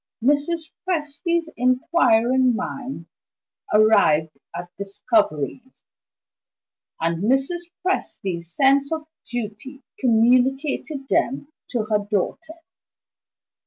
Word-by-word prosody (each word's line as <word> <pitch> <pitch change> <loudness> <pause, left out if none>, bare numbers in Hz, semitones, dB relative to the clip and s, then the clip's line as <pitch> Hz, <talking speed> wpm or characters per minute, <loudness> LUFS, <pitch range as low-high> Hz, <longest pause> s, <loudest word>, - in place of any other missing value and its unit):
Mrs. 295 +4 +1
Presty's 335 -1 -1
inquiring 255 -1 +3
mind 255 -6 -5 0.7
arrived 160 -8 +4 0.2
at 175 +1 -7
discoveries; 200 - -1 1.2
and 165 +2 -1
Mrs. 275 +8 0 0.2
Presty's 180 - -2
sense 275 - +3
of 315 -1 -3 0.2
duty 240 +4 -6 0.2
communicated 265 +4 +2
them 275 +3 0 0.2
to 240 -4 -1
her 215 -1 +1
daughter. 210 - -3
255 Hz, 80 wpm, -23 LUFS, 210-285 Hz, 1.2 s, arrived